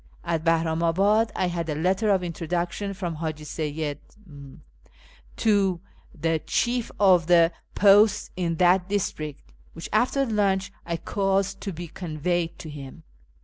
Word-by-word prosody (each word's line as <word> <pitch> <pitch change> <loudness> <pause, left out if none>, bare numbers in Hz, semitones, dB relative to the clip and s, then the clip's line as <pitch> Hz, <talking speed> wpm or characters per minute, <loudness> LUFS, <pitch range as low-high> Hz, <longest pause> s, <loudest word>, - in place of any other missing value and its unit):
At 165 -2 -1
Bahramabad 165 +7 +2
I - - +1
had 170 -2 -3
a 150 - -1
letter 185 +7 +1
of 190 -3 +2
introduction 175 +4 -3
from 175 -4 -4
Haji 155 -1 -4
Seyyid 150 -1 -4 0.3
M 145 -2 -13 0.7
to 200 -5 +2 0.4
the 165 +1 +1
chief 240 +7 -1
of 185 -5 +5
the 170 -1 +5 0.2
posts 205 +1 +5
in 170 -2 -1
that 180 +2 +3
district, 155 -7 -3 0.2
which, 165 - -8
after 255 +5 +2
lunch, 200 -3 0 0.2
I 170 -1 -1
caused 195 +2 -1
to 200 - -4
be 175 0 -7
conveyed 170 +1 -3
to 160 - -9
him. 145 +3 -10
175 Hz, 140 wpm, -25 LUFS, 160-195 Hz, 0.7 s, of